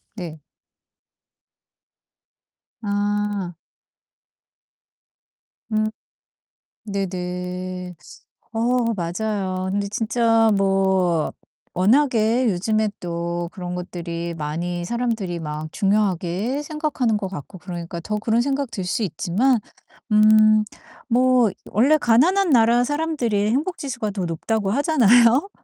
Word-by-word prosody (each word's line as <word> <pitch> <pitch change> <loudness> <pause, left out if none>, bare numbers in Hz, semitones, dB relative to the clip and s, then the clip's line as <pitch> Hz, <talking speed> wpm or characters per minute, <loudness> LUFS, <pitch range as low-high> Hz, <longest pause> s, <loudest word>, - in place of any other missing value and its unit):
네. 165 -6 -7 2.4
아. 205 -2 -1 2.2
음. 215 0 +1 1.0
네네. 180 -2 -4 0.6
어 225 - -2 0.4
맞아요. 185 +1 -2
근데 200 +1 -1
진짜 225 +1 +2
뭐 190 -4 +1 0.4
워낙에 230 +3 +3
요즘에 215 +3 0
또 170 0 -3
그런 180 -3 -5
것들이 170 -1 -5
많이 170 +3 -3
사람들이 225 -5 -2
막 155 0 -5
중요하게 200 - 0
생각하는 295 -7 -1
것 200 - -3
같고 185 +1 -9
그러니까 170 -1 -6
더 210 +6 -3
그런 225 +2 +1
생각 275 0 -1
들 195 - -4
수 180 +5 -1
있지만 210 - +1 0.5
음 215 0 +6 0.5
뭐 250 -1 +4 0.2
원래 270 +9 +4
가난한 325 +11 +3
나라 235 -1 +5
사람들이 270 -8 0
행복지수가 265 - -2
더 195 -3 -3
높다고 195 +5 -1
하잖아요? 250 - +4
205 Hz, 195 characters per minute, -22 LUFS, 180-235 Hz, 2.4 s, 음